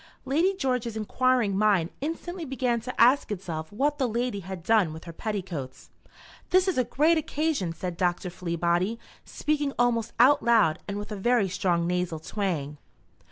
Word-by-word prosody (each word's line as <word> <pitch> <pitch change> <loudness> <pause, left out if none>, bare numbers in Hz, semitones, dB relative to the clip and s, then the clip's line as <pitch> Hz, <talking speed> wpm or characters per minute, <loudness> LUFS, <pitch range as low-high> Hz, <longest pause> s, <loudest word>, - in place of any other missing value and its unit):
Lady 330 +9 +2
George's 250 - -1
enquiring 235 -1 +1
mind 195 -5 +2
instantly 330 +4 -4
began 255 -4 -1
to 250 +3 -7
ask 250 +1 +5
itself 165 -5 -5
what 285 +8 0
the 260 - +2
lady 235 -2 -2
had 190 -2 -7
done 205 -6 +3
with 160 - -9
her 170 - -9
petticoats. 175 -10 -5 0.6
"This 370 +1 +4
is 370 -8 +1
a - - +4
great 315 +6 +2
occasion," 300 - -1
said 175 +1 -5
Dr. 175 0 0
Fleabody, 175 +4 -1 0.3
speaking 295 -2 -1
almost 235 -2 +1
out 265 +4 +6
loud, 220 -9 +3
and 200 0 -3
with 205 +1 -6
a - - -3
very 230 +1 +2
strong 175 -2 0
nasal 180 -1 -1
twang. 155 -4 -3
215 Hz, 160 wpm, -27 LUFS, 180-255 Hz, 0.6 s, out